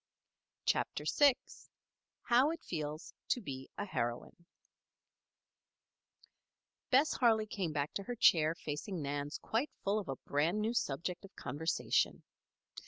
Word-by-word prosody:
CHAPTER - - 0
VI 285 -4 +5 0.9
HOW 250 +4 +4
IT 330 0 -4
FEELS 155 -1 -5
TO - - +1
BE 135 - -7
A 205 - -2
HEROINE 120 - -4 2.4
Bess 275 +5 +4
Harley 225 -4 +4
came 195 -6 -3
back 145 0 -2
to 200 - -3
her 245 - -3
chair 165 -10 +5
facing 160 +2 -4
Nan's 145 +1 -3
quite 240 +7 -1
full 200 +2 +2
of 195 - -7
a 135 - -1
brand 155 +10 0
new 220 +2 0
subject 175 - -2
of 195 - -13
conversation. 160 +3 0
180 Hz, 125 wpm, -34 LUFS, 150-225 Hz, 2.4 s, VI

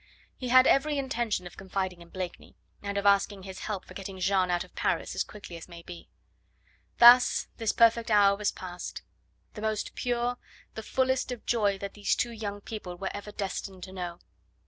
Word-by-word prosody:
He 255 - -5
had 255 +1 +7
every 295 +2 +3
intention 240 -8 -1
of 175 - -10
confiding 190 -2 -3
in 170 - -14
Blakeney, 185 -1 -7 0.3
and 200 0 -3
of 200 - -1
asking 200 -1 +3
his 190 -1 -8
help 205 -3 -4
for - - -12
getting 195 -1 -7
Jeanne 185 0 +2
out 175 -1 +1
of - - -18
Paris - - -1
as - - 0
quickly 200 -5 -10
as 165 - -11
may 170 -1 -11
be. 175 -1 -10 0.9
Thus 245 +1 +7
this 225 -2 +1
perfect 230 0 +4
hour 200 -2 +5
was 205 0 0
past; 180 -1 -7 0.5
the 210 - -8
most 215 -1 -2
pure, 245 0 -1 0.3
the 220 - -5
fullest 260 +3 0
of 245 - -6
joy 205 -4 +2
that 200 0 -6
these 205 -1 +1
two 240 - -1
young 205 -3 -5
people 195 -5 -7
were 190 +1 -3
ever 205 +1 -7
destined 195 -2 -5
to 185 - -8
know. 175 -2 -5
200 Hz, 190 wpm, -29 LUFS, 185-230 Hz, 0.9 s, had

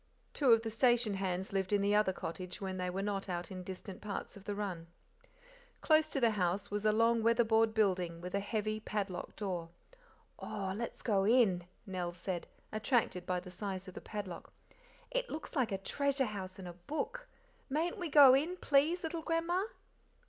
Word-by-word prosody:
Two 275 -5 +4
of 225 0 +6
the 225 - -3
station 240 -1 +3
hands 190 0 -2
lived 190 -1 0
in 205 - +4
the 200 +1 +3
other 210 -2 +4
cottage 180 0 -6
when 190 -1 -4
they 180 0 -1
were 190 +2 -2
not 200 -1 -2
out 175 0 -3
in 185 -1 -5
distant 185 +1 -8
parts 205 -2 -4
of 200 -1 -13
the 205 - -2
run. 185 -5 -4 0.9
Close 310 0 +4
to 280 - -1
the 235 -3 +4
house 190 -1 -1
was 205 +1 0
a - - +6
long 230 +1 +3
weather 230 +1 +4
board 225 0 +3
building 180 -5 +1
with 180 +1 -7
a 200 - +2
heavy, 215 +1 -2
padlocked 200 -4 -4
door. 180 -5 -3 0.7
"Oh, 190 -1 -3
let's 235 +2 -5
go 200 -5 +2
in," 200 -6 +4 0.2
Nell 180 -3 -3
said, 180 0 -4 0.2
attracted 215 -5 0
by 180 -1 +1
the 180 0 -10
size 190 0 -4
of 185 - -8
the - - -8
padlock; 195 -5 -6 0.6
"it - - -1
looks 315 +2 -6
like 255 -7 +1
a 195 - 0
treasure 275 +7 0
house 190 -4 -6
in 190 - -8
a 175 - -6
book 310 - -4 0.4
mayn't 330 +8 -1
we 350 -2 -3
go 280 -3 +9
in, 315 +7 +2
please, 310 +4 +3
little 325 0 -3
grandma?" 335 +3 0
205 Hz, 190 wpm, -34 LUFS, 185-245 Hz, 0.9 s, go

